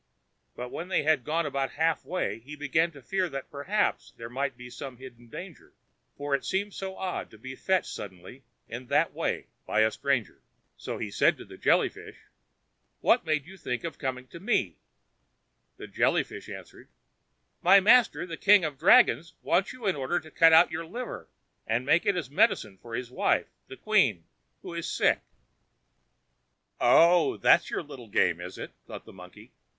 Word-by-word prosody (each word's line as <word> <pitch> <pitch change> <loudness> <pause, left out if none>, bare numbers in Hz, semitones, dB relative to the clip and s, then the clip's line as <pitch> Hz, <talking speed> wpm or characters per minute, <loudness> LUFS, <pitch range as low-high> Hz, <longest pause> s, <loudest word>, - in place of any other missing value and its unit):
But 125 0 -7
when 170 - -5
they 185 -5 +1
had 150 -4 +2
gone 160 +4 -1
about 140 -2 -2
half 160 +1 0
way, 180 -9 -3
he 140 +6 -10
began 155 +3 +1
to 140 -3 -14
fear 185 +6 -1
that 135 -1 -7
perhaps 180 +9 -1
there 115 0 -8
might 135 0 -2
be 125 -1 -10
some 130 0 -8
hidden 120 -2 -13
danger, 175 +5 -10 0.4
for 145 0 -3
it 140 - +1
seemed 200 +1 -2
so 190 -1 -6
odd 185 -1 -4
to 110 - -16
be 130 +4 -8
fetched 190 +6 0
suddenly 95 +7 -10 0.2
in 120 +2 -8
that - - +2
way - - -2 0.2
by - - +2
a 110 0 +3
stranger. 135 -5 -2 0.3
So - - -6
he - - -5
said - - +3
to - - -11
the - - -12
Jelly - - +3
fish: - - -12 0.9
"What - - +3
made 155 -2 0
you 190 +2 -13
think 125 -8 -4
of 170 - -6
coming 130 -2 -3
for 170 - -12
me?" 190 - 0 1.0
The - - -8
Jelly - - +1
fish - - -11
answered: - - -11 0.7
"My 195 +3 +7
master, 225 +1 +4
the 165 -2 -7
king 200 -3 +5
of 150 -3 -4
the - - -38
dragons, 165 +2 +5
wants 195 - +1
you 250 -3 -10
in 190 - +2
order 145 +5 -1
to 155 -1 -15
cut 165 0 +6
out 160 +2 +6
your 165 0 -5
liver, 240 +7 -7 0.4
and 115 +3 0
give 170 +7 +3
it 200 - +3
as 150 -7 -4
medicine 105 -8 +1
to 120 - -14
his 120 +1 -5
wife, - - 0 0.2
the 130 - -10
queen, 135 - +2 0.4
who - - -7
is 170 -1 -4
sick." - - +2 1.6
"Oh! 170 0 +5
that's 170 - +4
your - - -3
little 135 -6 -11
game, 90 -4 +1
is 90 +1 -8
it?" - - -7 0.2
thought - - -9
the - - -13
monkey. 90 -1 -14
145 Hz, 185 wpm, -28 LUFS, 125-175 Hz, 1.6 s, My